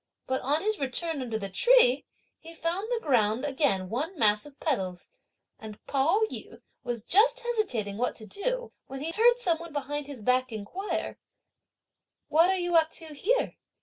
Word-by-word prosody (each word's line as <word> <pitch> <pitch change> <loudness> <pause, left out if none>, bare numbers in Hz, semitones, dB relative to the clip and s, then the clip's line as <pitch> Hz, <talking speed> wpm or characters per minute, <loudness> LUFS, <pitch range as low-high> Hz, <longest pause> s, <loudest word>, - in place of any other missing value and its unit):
But, 260 0 -1
on 295 +5 0
his 430 0 0
return 285 +3 -1
under 230 -3 -2
the 200 -2 -4
tree, - - +4 0.3
he 330 0 -12
found 350 +7 -2
the 475 -2 -2
ground 235 -2 +2
again 265 -10 +1
one 290 - -3
mass 210 +1 +3
of 285 -1 -17
petals, 190 - -2 0.5
and 215 -1 -9
Pao 285 +10 +2
yü - - -7 0.2
was 240 -3 -4
just 415 - +4
hesitating 330 - -1
what 250 +2 -1
to 220 - -8
do, - - -3 0.2
when 270 0 -7
he 320 +3 -2
heard 475 +6 +4
some 350 -10 +1
one 335 0 -9
behind 290 0 -3
his 280 -4 -8
back 255 +3 +1
inquire, 225 - -4 1.1
"What 330 +4 +5
are 380 - +2
you 350 -1 -1
up 320 -1 +5
to 320 -3 -9
here?" 455 - 0
295 Hz, 175 wpm, -28 LUFS, 245-380 Hz, 1.1 s, What